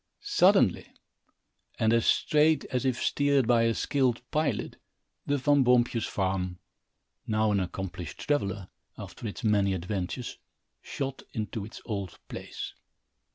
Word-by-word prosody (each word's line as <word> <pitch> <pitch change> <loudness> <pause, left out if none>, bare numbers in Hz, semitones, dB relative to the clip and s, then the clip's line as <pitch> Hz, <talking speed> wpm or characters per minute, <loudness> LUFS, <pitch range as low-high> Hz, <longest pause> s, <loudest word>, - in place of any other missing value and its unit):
Suddenly, - - +4 0.9
and 110 +1 +3
as 115 -1 +2
straight 155 +1 +3
as 130 0 -1
if 130 -2 +1
steered 140 -2 +2
by 115 -1 +4
a 115 -1 +2
skilled 130 -4 +1
pilot, 155 0 -1 0.5
the 145 - +2
Van 140 0 +3
Boompjes 120 -2 +3
farm, 95 -2 -1 0.7
now 110 0 +2
an 100 - +2
accomplished 90 -3 -5
traveller, 100 -10 -1 0.3
after 115 - -7
its 105 - -7
many 100 -3 +3
adventures, 95 +6 -4 0.4
shot 135 -1 -4
into 110 -1 -3
its 105 - -9
old 100 -5 -4
place. - - -6
115 Hz, 125 wpm, -28 LUFS, 100-130 Hz, 0.9 s, Suddenly